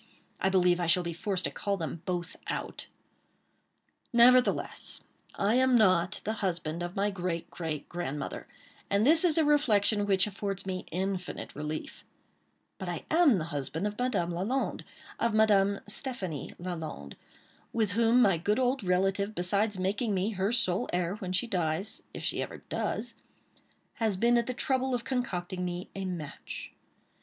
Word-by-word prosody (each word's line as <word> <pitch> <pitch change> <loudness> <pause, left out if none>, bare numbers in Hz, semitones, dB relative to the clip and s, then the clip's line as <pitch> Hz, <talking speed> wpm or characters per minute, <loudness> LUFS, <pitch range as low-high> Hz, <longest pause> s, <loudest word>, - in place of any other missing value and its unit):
I 190 - +2
believe 180 -2 +3
I 175 - 0
shall 175 +2 +4
be 170 0 -3
forced 185 +2 -1
to - - -1
call 200 -1 -1
them 165 -1 -4
both 175 0 -2
out. - - -4 1.2
Nevertheless, 250 +1 +4 0.4
I 200 +2 +2
am 260 0 +4
not 185 -3 +3
the 220 - 0
husband 170 -3 -2
of 175 +1 -4
my 205 +1 +1
great, 175 -3 -3
great, 160 -4 -4
grandmother; 160 -5 -4 0.4
and 200 +2 +3
this 320 +4 +6
is 335 -3 +4
a 320 - +4
reflection 215 -8 +3
which 195 -1 +4
affords 195 -1 -4
me 185 -1 -4
infinite 185 +1 -3
relief;—but 150 +1 -9
I - - -4
am 315 - +5
the 160 - -2
husband 145 +6 -2
of 210 +1 -3
Madame 245 -9 0
Lalande—of 225 +2 -2
Madame 200 -2 +4
Stéphanie 205 - -4
Lalande—with 175 - -5
whom 230 +4 +4
my 195 -6 +3
good 205 +5 +1
old 255 -1 +1
relative, 195 +3 +1
besides 200 +3 +1
making 200 +3 0
me 190 +4 0
her 195 +1 0
sole 195 -7 +2
heir 175 0 0
when 185 -4 -5
she 185 +5 +2
dies—if 185 - -3
she - - 0
ever - - -6
does—has 220 -4 -5
been 235 +4 +4
at 235 - -2
the 255 - -2
trouble 260 0 0
of 240 - -3
concocting 185 -8 -2
me 180 0 -4
a 195 -1 -4
match. 170 -6 -6
195 Hz, 150 wpm, -30 LUFS, 175-225 Hz, 1.2 s, this